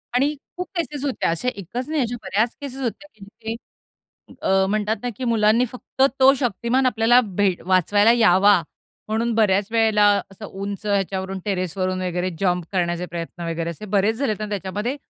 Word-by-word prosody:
आणि 280 +4 +2 0.2
खूप 360 0 -4
केसेस 300 -5 -3
होत्या 275 - -1
अशा, 165 +8 -2
एकच 205 +7 -6
नाही, 310 -2 0
अशा 240 -1 -2
बऱ्याच 220 +4 0
केसेस 270 -1 -6
होत्या 255 +4 -4
ज्यांचे, 220 +2 -8 0.9
अ, 190 0 +3
म्हणतात 215 +1 0
ना, 245 - -1
की - - -5
मुलांनी 225 +1 +3
फक्त 250 +1 -7 0.2
तो 265 +1 +7
शक्तिमान 245 +2 0
आपल्याला 240 0 +4 0.2
भेट 190 -3 +1
वाचवायला 205 +4 +4
यावा, 205 -4 +5 0.5
म्हणून 225 +2 0
बऱ्याच 205 -3 +2
वेळेला 220 -2 +3 0.3
असं 200 +2 -10
उंच 200 +1 -6
ह्याच्यावरून, 195 -1 -1
टेरेस 185 -2 -2
वरून 185 0 -1
वगैरे, 180 0 -1
जम्प 180 -3 0
करण्याचे 175 -2 -1
प्रयत्न 170 0 -6
वगैरे, 165 0 -3
असे 170 +5 -7
बरेच 205 +3 +2
झालेत 255 -5 0
ना 215 -1 -4
त्याच्यामध्ये, 205 +5 -3
210 Hz, 165 wpm, -22 LUFS, 190-235 Hz, 0.9 s, तो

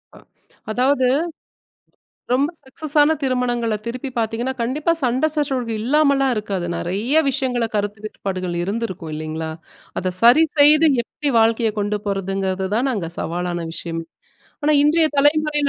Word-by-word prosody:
அ. - - -14 0.5
அதாவது 260 +3 +2 1.3
ரொம்ப 280 +4 +2
சக்சஸான 295 +3 +2
திருமணங்களை 245 -3 0
திருப்பி 250 +3 -4
பார்த்திங்கன்னா, 230 +3 -1
கண்டிப்பாக 295 +8 0
சண்டை 255 +4 +2
சச்சரவு 265 -6 -1
இல்லாமலா 280 +1 +3
இருக்காது. 200 -4 -3
நிறைய 205 - -1
விஷயங்களை 245 -3 -1
கருத்து 205 0 -2
வேட்பாடுகள் 185 -4 -4
இருந்திருக்கும் 190 -5 -4
இல்லைங்களா? 155 +1 -4 0.5
அத 185 0 -2
சரி 245 +8 +7
செய்து 300 +2 +6 0.2
எப்டி 285 +3 -3
வாழ்க்கையை 225 0 +2
கொண்டு 205 0 -1
போறதுங்கிறது 195 -1 -2
தான், 250 +5 +1
நாங்க 190 -9 -3
சவாலான 175 +1 -3
விஷயம். 165 0 -4 0.6
ஆனா, 300 - +3
இன்றைய 315 +2 +4
தலைமுறையில 295 0 +3
235 Hz, 120 wpm, -20 LUFS, 195-280 Hz, 1.3 s, சரி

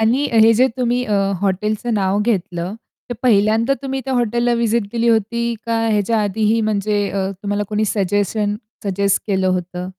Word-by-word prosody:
आणि 245 +6 +2
हे 225 0 +6
जे 255 +4 +4
तुम्ही 250 0 0
अ, 215 - -3 0.3
हॉटेलचं 210 +4 -1
नाव 195 -1 +1
घेतलं 185 -4 -2 0.4
ते 245 - -2
पहिल्यांदा 225 +2 +3
तुम्ही 270 0 -3
त्या 265 - -3
हॉटेलला 240 0 +1
व्हिजिट 235 -1 +1
दिली 235 0 +1
होती 235 +1 +1
का 230 -1 0
ह्याच्या 215 +1 +1
आधीही 215 +2 +1
म्हणजे 205 -1 0
अ, 195 -1 -2
तुम्हाला 205 0 -1
कोणी 215 0 0
सजेशन 205 +1 0 0.3
सजेस्ट 200 0 0
केलं 190 -2 +1
होतं? 180 0 -3
215 Hz, 160 wpm, -19 LUFS, 200-235 Hz, 0.4 s, हे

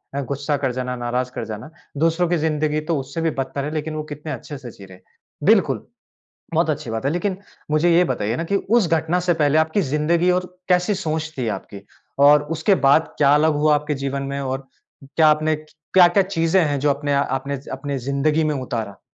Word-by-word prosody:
अ, 140 - -1
गुस्सा 140 +2 -2
कर 135 -2 -1
जाना, 125 0 -3
नाराज़ 125 +1 -2
कर 120 - -5
जाना। 110 +5 -7 0.3
दूसरों 165 +3 +2
की 175 - +2
जिंदगी 155 -1 0
तो 165 - +2
उससे 135 +5 -5
भी 165 - +1
बदतर 135 +1 -3
है 150 - -4
लेकिन 155 0 -3
वो 155 - -3
कितने 150 +1 -6
अच्छे 145 +2 -7
से 125 -3 -9
जी 100 - -13
रहे 95 -1 -14
हैं। - - -29 0.4
बिल्कुल। - - +3 0.7
बहुत - - +2
अच्छी - - -2
बात 115 +3 -3
है 140 - +2
लेकिन 185 +3 -1 0.3
मुझे 155 +3 +3
यह 180 +1 +5
बताइए 110 -8 -1
ना 165 - -2
कि 200 +4 -1 0.2
उस 210 -7 +2
घटना 165 +2 +1
से 175 - +4
पहले 145 +1 +3
आपकी 160 +5 +2
जिंदगी 165 +4 +1
और 180 0 0 0.2
कैसी 180 +3 +3
सोच 160 -4 -3
थी 125 -3 -2
आपकी? 100 - -12 0.4
और 145 +1 +6
उसके 165 +6 +3
बाद 155 +4 +3
क्या 140 -1 +5
अलग 155 +1 +3
हुआ 150 +1 +3
आपके 150 +1 -1
जीवन 140 0 -2
में 140 - -3
और 135 0 -4 0.4
क्या 155 +4 +3
आपने 155 +1 +3
क्या-क्या 175 +5 +2
चीज़ें 185 -1 +1
हैं 145 -2 -1
जो 145 +2 +2
अपने 145 0 0
आ 140 - +3
आपने 140 +1 -2
अपनी 140 +1 -4
जिंदगी 140 +5 0
में 155 -1 0
उतारा? 115 -7 -4
150 Hz, 215 wpm, -21 LUFS, 135-160 Hz, 0.7 s, और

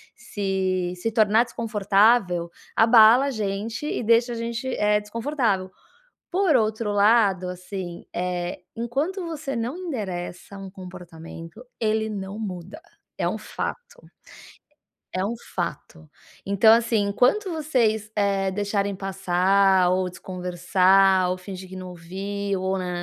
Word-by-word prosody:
se 190 -3 -2
se 205 +6 -3
tornar 220 0 +4
desconfortável, 205 -5 +2 0.3
abala 225 +3 +7
a 280 - -1
gente 215 +3 -3
e - - -2
deixa 235 +2 +3
a - - -4
gente, 235 +2 -4
eh, 210 0 +2
desconfortável. 225 -4 -1 0.6
Por 370 -4 +3
outro 220 -2 +1
lado, 205 -3 +3
assim, 180 -1 -7
eh, 180 0 -3
enquanto 280 - -2
você 315 -4 -5
não 235 +5 -3
endereça 200 - -5
um 195 -1 -8
comportamento, 180 0 -11 0.2
ele 220 -1 0
não 200 0 -6
muda, 190 - -7 0.4
é - - +1
um - - -3
fato. 485 - -6 1.1
É 185 - 0
um 225 - -2 0.2
fato. 80 -1 -5 0.4
Então, 200 +3 +5
assim, 230 -1 +1
enquanto 255 - +2
vocês, 235 -9 0
eh, 195 -2 +1
deixarem 200 0 -1
passar, 190 0 +2
ou 185 0 +1
desconversar, 185 +1 +2
ou 180 - -1
fingir 185 0 -9
que 190 - -9
não 185 0 -7
ouviu, 195 +3 -4
ou 190 +1 0
nã, 180 -1 -3
200 Hz, 130 wpm, -24 LUFS, 185-230 Hz, 1.1 s, abala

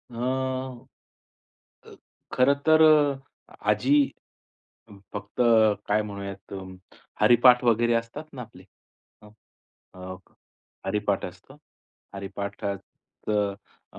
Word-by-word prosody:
अ, 120 - -12
अ, 130 0 -4 1.2
खरं 130 +3 +4
तर, 160 0 +6
अ, 145 -3 +2 0.2
आजी 125 +7 +3 0.9
अ, - - -15 0.2
फक्त 100 +4 -7 0.5
काय 105 +1 +2
म्हणूयात, 100 -2 -8 0.7
हरिपाठ 125 +1 +6
वगैरे 120 0 +3
असतात 115 +6 -3
ना, 125 - -6
आपले, 95 -5 -14 0.6
हं, 105 - -15 0.6
अ, 95 0 -8 0.7
हरिपाठ 105 -1 -1
असतं. - - -13 0.6
हरिपाठाचं 100 +1 -4 0.4
अ, - - -11
115 Hz, 90 wpm, -26 LUFS, 100-130 Hz, 1.2 s, तर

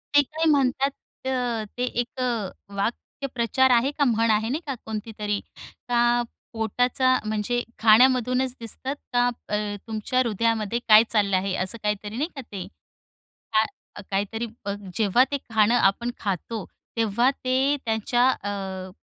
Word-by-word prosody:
ते 290 - +9
काय 315 +3 -3
म्हणतात 270 0 +2 0.4
अ, 245 -4 -1
ते 250 - -1
एक 245 +1 -2
अ, 230 -6 -1 0.3
वाक्प्रचार 245 +4 0
आहे 245 +3 +4
का 290 - +3
म्हण 230 -1 +2
आहे 220 +2 +1
नाही 300 +6 -1
का 275 - -2
कोणतीतरी? 210 -1 -3 0.5
का 240 0 +3 0.3
पोटाचा 245 +3 +2
म्हणजे 215 +3 -1 0.2
खाण्यामधूनच 250 +3 +4
दिसतात 260 +5 -4 0.2
का 245 0 +4 0.2
अ, 210 0 -1
तुमच्या 220 +3 -1
हृदयामध्ये 230 -1 +1
काय 215 +1 +9
चाललं 200 -4 +3
आहे. 190 0 -1
असं 185 +5 -2
काहीतरी 210 +1 -2
नाही 305 +5 -1
का 275 - -5
ते? 200 -6 -7 0.9
काय 215 -1 -1
काहीतरी 205 +4 -1 0.2
बघ 200 0 -1 0.2
जेव्हा 220 +3 +4
ते 285 - +1
खाणं 220 +1 +4
आपण 235 +3 +2
खातो. 200 +2 -3 0.3
तेव्हा 230 +3 +3
ते 265 +3 +2
त्यांच्या 235 +3 +2 0.2
अ, 190 -2 -4
230 Hz, 140 wpm, -25 LUFS, 210-255 Hz, 0.9 s, ते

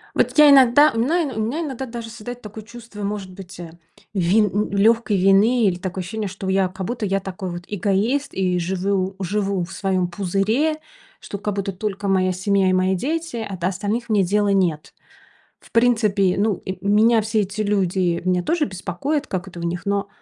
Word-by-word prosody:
Вот - - +1
я 300 -1 +8
иногда 275 +2 +6
у 225 - -2
мна 325 +9 +2
у 220 - -3
меня 245 +10 -1
иногда 265 -4 -5
даже 230 -1 -7
создается 240 +1 -8
такое 215 +1 -9
чувство, 230 -1 -11
может 200 -2 -4
быть, 185 -1 -11
э, 170 -2 -8 0.4
вин 195 +3 +3
н 210 +1 0
лёгкой 215 +1 +2
вины, 200 +6 +4
или 180 -2 +1
такое 185 0 -4
ощущение, 215 +2 -4
что 190 0 -6
я, 190 -1 +2
как 185 +1 -6
будто 235 0 -3
я 195 +1 0
такой 190 -1 -6
вот 175 0 -6
эгоист 210 +8 0
и 180 -2 0
живю 190 +2 -1
живу 195 0 -1
в 175 - -8
своём 190 -2 0
пузыре, 200 - 0 0.4
что 200 - -7
как 210 -1 -3
будто 195 0 -2
только 200 +1 -4
моя 185 -1 +2
семья 190 +1 +1
и 185 - +2
мои 185 +1 +2
дети, 315 - -3
а 195 - -6
до 175 +1 -1
остальных 210 +5 -3
мне 205 -3 +3
дела 205 +2 +1
нет. 175 -6 0 0.7
В - - -21
принципе, 215 -6 +2
ну, 210 +1 +2
и 190 0 -4
меня 220 +2 +4
все 220 +1 -1
эти 205 +2 -3
люди, 185 -4 0
меня 180 -1 +1
тоже 335 - +1
беспокоят, 270 - -3
как 190 0 -4
это 175 -2 -10
у - - -6
них, 175 +3 -3
но 200 0 0
200 Hz, 200 wpm, -21 LUFS, 185-225 Hz, 0.7 s, я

